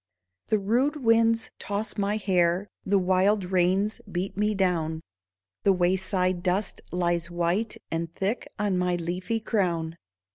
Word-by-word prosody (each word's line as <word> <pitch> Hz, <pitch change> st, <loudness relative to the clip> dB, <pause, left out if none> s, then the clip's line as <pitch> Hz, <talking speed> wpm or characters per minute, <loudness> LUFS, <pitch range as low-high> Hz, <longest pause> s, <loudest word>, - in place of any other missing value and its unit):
The 215 Hz, -, +3 dB
rude 240 Hz, +9 st, +1 dB
winds 230 Hz, -3 st, +3 dB
toss 205 Hz, +2 st, -3 dB
my 205 Hz, 0 st, 0 dB
hair, 185 Hz, -1 st, +1 dB, 0.2 s
The 200 Hz, +1 st, +2 dB
wild 190 Hz, +2 st, +2 dB
rains 190 Hz, +4 st, +2 dB
beat 180 Hz, +2 st, -3 dB
me 210 Hz, +1 st, +1 dB
down. 165 Hz, -4 st, 0 dB, 0.6 s
The 200 Hz, -, +5 dB
wayside 185 Hz, 0 st, +1 dB
dust 185 Hz, +3 st, -1 dB
lies 175 Hz, -1 st, 0 dB
white 175 Hz, +6 st, -1 dB
And 165 Hz, 0 st, -2 dB
thick 200 Hz, +6 st, -1 dB
on 200 Hz, -3 st, 0 dB
my 180 Hz, 0 st, +1 dB
leafy 180 Hz, +6 st, -2 dB
crown. 170 Hz, -7 st, -1 dB
190 Hz, 135 wpm, -27 LUFS, 175-210 Hz, 0.6 s, The